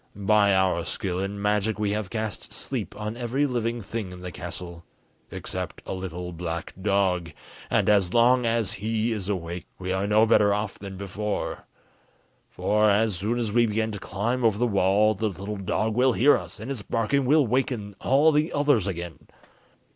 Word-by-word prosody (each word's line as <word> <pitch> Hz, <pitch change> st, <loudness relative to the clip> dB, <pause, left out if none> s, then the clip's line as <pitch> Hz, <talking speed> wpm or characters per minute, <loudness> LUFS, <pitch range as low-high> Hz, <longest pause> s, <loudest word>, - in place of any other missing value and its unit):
By 100 Hz, 0 st, +3 dB
our 95 Hz, -2 st, +2 dB
skill 90 Hz, 0 st, -3 dB
in 100 Hz, +1 st, -3 dB
magic 105 Hz, +1 st, +1 dB
we 105 Hz, -1 st, 0 dB
have 105 Hz, -2 st, -2 dB
cast 110 Hz, -1 st, -4 dB
sleep 105 Hz, -, -5 dB
on 105 Hz, +1 st, -4 dB
every 125 Hz, +4 st, 0 dB
living 120 Hz, -3 st, -1 dB
thing 105 Hz, -2 st, -5 dB
in 90 Hz, 0 st, -10 dB
the 90 Hz, 0 st, -6 dB
castle, 85 Hz, +1 st, -7 dB, 0.5 s
except -, -, -5 dB
a -, -, -4 dB
little 90 Hz, -1 st, -5 dB
black 85 Hz, 0 st, -5 dB
dog, 95 Hz, -4 st, +1 dB, 0.4 s
and, -, -, +2 dB
as 100 Hz, -4 st, +3 dB
long 125 Hz, +2 st, +4 dB
as 115 Hz, -3 st, +1 dB
he 110 Hz, +2 st, -1 dB
is 105 Hz, -3 st, -3 dB
awake, 85 Hz, -2 st, -4 dB
we 95 Hz, 0 st, -4 dB
are 95 Hz, +1 st, -1 dB
no 105 Hz, +2 st, +5 dB
better 105 Hz, -2 st, +4 dB
off 105 Hz, -1 st, -4 dB
than 95 Hz, -1 st, -8 dB
before; 100 Hz, +2 st, -4 dB, 0.8 s
for, 105 Hz, 0 st, +2 dB
as 105 Hz, +1 st, +3 dB
soon 105 Hz, +7 st, -1 dB
as 115 Hz, -3 st, -1 dB
we 120 Hz, +1 st, +4 dB
begin 110 Hz, +1 st, -1 dB
to 105 Hz, -, -6 dB
climb 120 Hz, +8 st, -2 dB
over 110 Hz, -3 st, +3 dB
the 120 Hz, -, +2 dB
wall, 100 Hz, 0 st, +3 dB
the 110 Hz, +2 st, -1 dB
little 100 Hz, +2 st, -6 dB
dog 110 Hz, +3 st, -1 dB
will 125 Hz, +2 st, +3 dB
hear 140 Hz, +6 st, +5 dB
us, -, -, -6 dB
and 115 Hz, +6 st, -5 dB
its 130 Hz, -6 st, -3 dB
barking 115 Hz, +6 st, 0 dB
will 150 Hz, +2 st, +4 dB
waken 115 Hz, -4 st, -1 dB
all 145 Hz, +4 st, +4 dB
the 150 Hz, +2 st, +1 dB
others 145 Hz, -9 st, +2 dB
again. 85 Hz, -3 st, -6 dB
105 Hz, 185 wpm, -26 LUFS, 95-115 Hz, 0.8 s, no